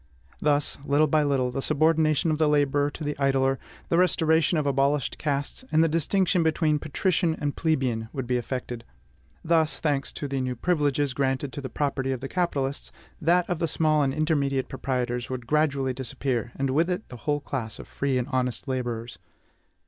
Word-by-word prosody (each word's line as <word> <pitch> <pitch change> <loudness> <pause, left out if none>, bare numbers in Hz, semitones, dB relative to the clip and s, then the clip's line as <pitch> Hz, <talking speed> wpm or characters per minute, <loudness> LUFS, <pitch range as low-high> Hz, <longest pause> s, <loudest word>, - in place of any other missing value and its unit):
Thus, 145 -1 +1
little 145 +2 +3
by 155 +1 +2
little, 135 -4 +1
the 135 - -3
subordination 155 +1 +2
of 155 - -1
the 155 -1 +3
laborer 145 -1 +2
to 150 - -8
the 150 0 -2
idler, 135 -1 +2 0.3
the 170 - +3
restoration 160 -2 +3
of 150 - 0
abolished 140 0 +1
castes, 145 - -2
and 160 +1 +5
the - - +4
distinction 175 +3 +2
between 155 -2 +2
patrician 165 +2 0
and 145 -1 -2
plebeian, 130 -9 0
would 135 -2 -4
be 125 +1 0
effected; 120 -1 -4 0.6
thus, 160 -1 +2
thanks 145 -3 0
to 145 - -4
the 135 -1 -2
new 130 -1 -2
privileges 145 -2 +1
granted 135 +1 -1
to 145 - -5
the 130 - -5
property 135 -1 -1
of 130 - -2
the 135 - -5
capitalists, 140 -5 -2 0.3
that 175 +2 +3
of 175 -4 -2
the 165 - +1
small 155 -1 +2
and 135 -2 +2
intermediate 140 -4 0
proprietors 125 -2 -2
would 130 -2 -5
gradually 140 -2 +1
disappear, 125 -1 -3
and 135 -1 -1
with 165 +6 +2
it 180 +4 -3
the 125 - -9
whole 145 +5 -1
class 125 -6 -5
of - - -10
free 140 -2 -1
and 125 0 -1
honest 130 -1 -1
laborers. 120 -6 -3
140 Hz, 185 wpm, -26 LUFS, 130-155 Hz, 0.6 s, and